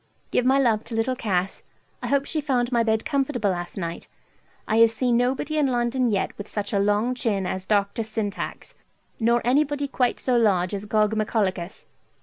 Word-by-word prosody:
Give 250 Hz, -, +1 dB
my 265 Hz, +2 st, +4 dB
love 230 Hz, -5 st, +2 dB
to 230 Hz, 0 st, -5 dB
little 230 Hz, +3 st, 0 dB
Cass. 195 Hz, -6 st, -1 dB, 0.4 s
I -, -, -3 dB
hope 280 Hz, 0 st, +1 dB
she 310 Hz, -, -2 dB
found 255 Hz, -4 st, 0 dB
my 235 Hz, -1 st, +3 dB
bed 220 Hz, -1 st, 0 dB
comfortable 270 Hz, -8 st, 0 dB
last 175 Hz, 0 st, -5 dB
night. 170 Hz, -3 st, -5 dB, 0.6 s
I 220 Hz, -, +1 dB
have 230 Hz, 0 st, +7 dB
seen 240 Hz, +2 st, 0 dB
nobody 265 Hz, +5 st, 0 dB
in 290 Hz, -, +3 dB
London 245 Hz, 0 st, +1 dB
yet 200 Hz, -3 st, -1 dB
with 205 Hz, -, -6 dB
such 205 Hz, 0 st, -3 dB
a 200 Hz, -, +2 dB
long 205 Hz, +5 st, +1 dB
chin 215 Hz, -6 st, -1 dB
as 185 Hz, +1 st, -4 dB
Dr. 205 Hz, +2 st, +1 dB
Syntax, 215 Hz, -1 st, -4 dB, 0.5 s
nor 235 Hz, +1 st, +2 dB
anybody 285 Hz, +2 st, +1 dB
quite 250 Hz, -3 st, 0 dB
so 255 Hz, -, 0 dB
large 195 Hz, -5 st, +2 dB
as 200 Hz, +1 st, -4 dB
Gogmagolicus. 210 Hz, -3 st, 0 dB
225 Hz, 180 wpm, -24 LUFS, 205-255 Hz, 0.6 s, have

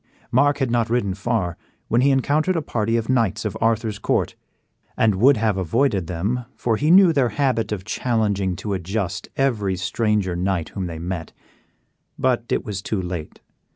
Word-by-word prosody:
Mark 145 Hz, +3 st, +3 dB
had 135 Hz, -4 st, -1 dB
not 115 Hz, -2 st, +1 dB
ridden 115 Hz, -5 st, 0 dB
far 95 Hz, -3 st, -2 dB, 0.3 s
when 120 Hz, +2 st, +2 dB
he 140 Hz, -, +4 dB
encountered 145 Hz, +6 st, +2 dB
a 165 Hz, -, +1 dB
party 115 Hz, -3 st, 0 dB
of 115 Hz, -1 st, -2 dB
knights 115 Hz, -4 st, +1 dB
of 105 Hz, -, -2 dB
Arthur's 115 Hz, -2 st, 0 dB
court, -, -, 0 dB, 0.6 s
and 110 Hz, -2 st, +3 dB
would 125 Hz, +8 st, +5 dB
have 105 Hz, -2 st, +1 dB
avoided 95 Hz, -, +1 dB
them, 105 Hz, +9 st, -2 dB
for 115 Hz, -2 st, 0 dB
he 150 Hz, +8 st, 0 dB
knew 180 Hz, -1 st, +7 dB
their 135 Hz, -5 st, +2 dB
habit 115 Hz, -2 st, 0 dB
of 95 Hz, -3 st, -4 dB
challenging 105 Hz, -6 st, 0 dB
to 105 Hz, +3 st, -4 dB
a 95 Hz, -, -1 dB
just 95 Hz, +1 st, -3 dB
every 110 Hz, -8 st, +1 dB
stranger 100 Hz, 0 st, 0 dB
knight 90 Hz, -2 st, -1 dB
whom 95 Hz, -3 st, -4 dB
they 85 Hz, -2 st, -6 dB
met. 85 Hz, 0 st, -5 dB, 0.8 s
But 125 Hz, -2 st, +1 dB
it -, -, 0 dB
was 100 Hz, -4 st, -4 dB
too 105 Hz, 0 st, -2 dB
late. 90 Hz, -4 st, -6 dB
110 Hz, 180 wpm, -22 LUFS, 95-125 Hz, 0.8 s, knew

